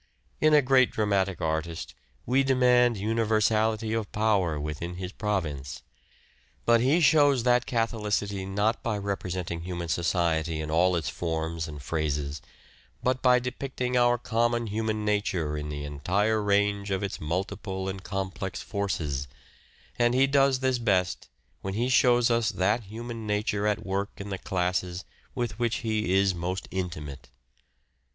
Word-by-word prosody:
In 155 0 +5
a 145 - +6
great 130 -1 +5
dramatic 100 -4 0
artist 80 +1 -2 0.3
we 130 +3 +3
demand 125 -3 +4
universality 110 +1 +1
of 110 -3 -2
power 100 -8 +1
within 75 +4 -4
his 90 0 -5
province; 80 - -3 0.8
but 115 -1 +5
he 140 +7 +3
shows 145 -4 +5
that 125 0 +3
catholicity, 105 -4 -1
not 105 +4 0
by 110 -3 -1
representing 90 -4 -3
human 85 -1 -5
society 80 -1 0
in 75 0 -4
all 90 +3 +3
its 85 - -2
forms 80 -1 -3
and 75 -2 -8
phases, 75 -2 -2 0.6
but 130 0 +1
by 125 -1 +5
depicting 125 0 -3
our 120 0 +4
common 120 0 0
human 110 0 -2
nature 95 -7 0
in 75 0 -4
the 75 -1 -5
entire 100 +10 0
range 100 0 +1
of 95 0 -1
its 100 - -4
multiple 95 +3 -3
and 95 0 -5
complex 95 0 -4
forces; 80 -10 -2 0.7
and 120 0 +3
he 135 +1 +5
does 135 -1 +3
this 130 -2 +1
best 95 -6 0 0.3
when 95 0 -4
he 120 +3 0
shows 120 -1 +4
us 115 -2 +2
that 105 +5 0
human 115 +2 -7
nature 105 0 0
at 105 +1 -1
work 100 +1 -1
in 100 0 -7
the 95 - -3
classes 90 0 -2 0.3
with 120 -3 -3
which 120 -1 +1
he 110 -4 0
is 95 -1 +3
most 90 +2 -4
intimate. 75 -9 -5
100 Hz, 145 wpm, -27 LUFS, 90-115 Hz, 0.8 s, a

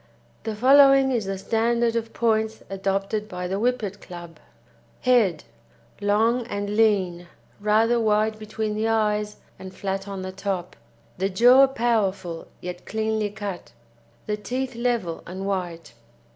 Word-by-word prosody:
The 220 -1 -2
following 270 +3 +6
is 235 -5 0
the 195 0 -3
standard 230 +3 +1
of 225 -1 -2
points 220 -1 0
adopted 195 +2 -2
by 180 -2 -4
the 190 +2 -2
Whippet 220 -4 -1
Club: 175 -2 -10 0.6
HEAD 225 -11 +3 0.6
Long 220 +4 +2
and 205 -1 -3
lean, 190 -6 +2 0.3
rather 220 +3 +3
wide 215 0 +1
between 215 0 -3
the 215 +1 -1
eyes 210 -1 0 0.2
and 190 - -8
flat 195 0 -4
on 195 -2 -5
the 185 - -5
top; 190 -2 -4 0.4
the 190 +1 +1
jaw 245 +7 +6
powerful 200 -9 -1
yet 180 0 -7
cleanly 220 -1 -1
cut; 200 - -7 0.5
the 210 0 -2
teeth 255 +4 -3
level 235 -8 -1
and 190 +2 -6
white. 175 -8 -4
210 Hz, 135 wpm, -24 LUFS, 195-230 Hz, 0.6 s, following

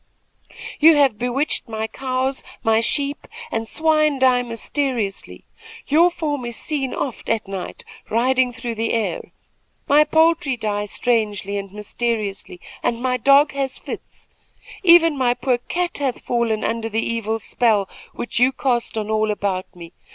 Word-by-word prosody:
"You 315 +1 +7
have 270 -7 +3
bewitched 250 +1 -1
my 220 0 -3
cows; 260 +2 -2 0.2
my 225 0 +3
sheep 280 +5 0 0.2
and 225 0 -2
swine 305 0 +2
die 255 -1 +4
mysteriously. 235 -3 -3 0.4
Your 330 +5 +4
form 295 -6 -3
is 235 -1 -4
seen 275 -4 -2
oft 260 - -4
at 225 -2 0
night 195 -2 -6 0.2
riding 250 +2 +2
through 235 0 -5
the 225 +1 -2
air. 225 -2 -2 0.6
My 295 +2 +6
poultry 320 -3 +2
die 210 -2 -2
strangely 210 -3 -1
and 195 -1 -8
mysteriously, 210 -3 -3 0.2
and 235 -1 -1
my 250 0 0
dog 275 +4 +5
has 270 -1 -3
fits. - - -9 0.5
Even 335 -4 +6
my 250 -3 +1
poor 250 -2 0
cat 350 +7 -3
hath 270 -3 -2
fallen 235 -3 -1
under 225 0 -2
the 225 +1 -1
evil 225 -1 -1
spell 220 -3 +1 0.2
which 240 - -3
you 250 +2 +5
cast 245 -4 -1
on 215 0 -2
all 215 0 +1
about 195 -3 -2
me. 170 -1 -11
245 Hz, 150 wpm, -21 LUFS, 220-275 Hz, 0.6 s, You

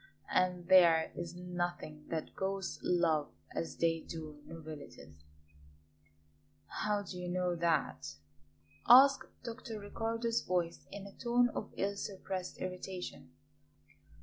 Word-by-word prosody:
And 180 -1 +1
there 170 -4 +6
is 170 0 -6
nothing 175 -4 -4
that 160 -2 -3
ghosts 195 -1 -2
love 165 -4 +2 0.2
as 80 0 -3
they 165 -1 +2
do 155 -2 -8
novelties 145 - -10 0.8
" 75 0 -12
"How 210 -1 +1
do 180 -2 -7
you 180 0 -4
know 180 0 0
that?" 80 - 0 0.7
asked 270 +3 +8 0.2
Dr. 230 -2 -6
Riccardo's 230 +3 -1
voice 175 -2 -1
in 200 0 -7
a 200 - -9
tone 245 +1 +3
of - - -5
ill 200 +1 0
suppressed 190 -2 -4
irritation. 185 -4 -6
180 Hz, 120 wpm, -34 LUFS, 160-195 Hz, 0.8 s, asked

